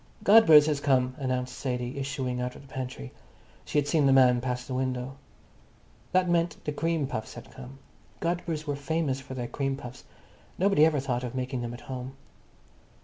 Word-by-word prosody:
"Godber's 195 -9 +8
has 150 -2 0
come," 130 -3 +2
announced 130 -2 -2
Sadie, 125 0 -3
issuing 135 -2 -3
out 125 0 -3
of - - -12
the - - -16
pantry. 130 - -6 0.5
She - - -2
had 145 -1 +2
seen 145 -1 +3
the - - +5
man 125 -2 +5
pass 125 -1 -3
the 130 - -6
window. 130 0 -2 1.0
That 185 0 +3
meant 170 -2 +1
the 150 - -1
cream 160 0 -1
puffs 110 -5 -5
had - - -11
come. 130 +1 -11 0.4
Godber's 170 -2 -2
were 145 -2 -2
famous 145 -1 -1
for 130 0 -9
their 125 -2 -3
cream 135 +1 -2
puffs. 125 -2 -10 0.5
Nobody 190 -5 +4
ever 155 -3 +1
thought 130 -2 -2
of 125 0 -5
making 130 -1 -3
them 120 0 -4
at 120 - -12
home. 130 0 -7
135 Hz, 185 wpm, -28 LUFS, 125-150 Hz, 1.0 s, Godber's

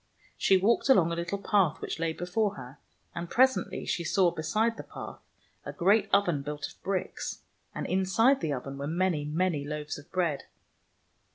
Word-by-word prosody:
She 190 - +4
walked 225 +8 +2
along 175 -11 +5
a - - -1
little 175 +3 -2
path 195 -5 +2
which - - -5
lay 165 -1 0
before 195 +5 -1
her, 130 0 -10 0.3
and 170 0 -5
presently 260 +1 +2
she 170 - -1
saw, 180 0 +3
beside 215 +8 0
the - - -7
path, - - -9 0.4
a - - -5
great 200 +3 +3
oven 175 -7 +3
built 145 +1 -5
of - - -17
bricks, 190 -1 -3 0.3
and - - -3
inside 190 +8 +3
the 160 -3 -1
oven 135 +1 -5
were 140 - -3
many, 170 -2 0
many 155 0 0
loaves 150 0 -5
of 145 - -17
bread. 170 -6 -1
175 Hz, 175 wpm, -29 LUFS, 150-200 Hz, 0.4 s, along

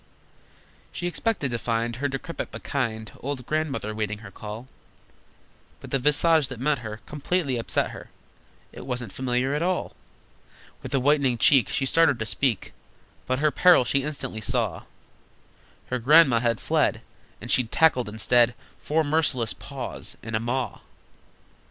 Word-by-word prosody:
She 175 - -5
expected 175 - -1
to 120 - -1
find 115 0 -1
Her 145 +2 -1
decrepit 135 +5 -5
but - - -9
kind 110 -6 -3
Old 135 -2 -5
Grandmother 150 -8 -2
waiting 105 -1 -3
her 100 - -10
call, 110 +5 -8 1.1
But - - -11
the 135 - +1
visage 150 +2 +3
that 130 -3 -7
met 145 +1 +1
her 110 -1 -7
Completely 150 -1 -1
upset 115 - 0
her: - - -10 0.6
It - - -10
wasn't 125 -6 -4
familiar 130 +1 -1
at 150 - -1
all! 180 +1 -1 0.9
With - - -8
a - - +3
whitening 135 -2 +2
cheek 135 0 +5
She 135 - -1
started 160 -1 +3
to 110 - -3
speak, 115 -2 -1 0.5
But 130 - +1
her 150 +2 +2
peril 175 -2 +5
she 140 +3 +2
instantly 135 -6 -5
saw: 100 - -1 1.1
Her 125 - 0
Grandma 135 -1 +6
had 115 -1 0
fled, - - +1 0.4
And 120 - -6
she'd 125 -3 +2
tackled 130 -8 +3
instead 120 +3 +3 0.2
Four 160 +2 0
merciless 145 -8 +1
Paws - - -3
and 110 0 -4
a - - +1
Maw! 120 +1 -2
130 Hz, 150 wpm, -25 LUFS, 115-150 Hz, 1.1 s, Grandma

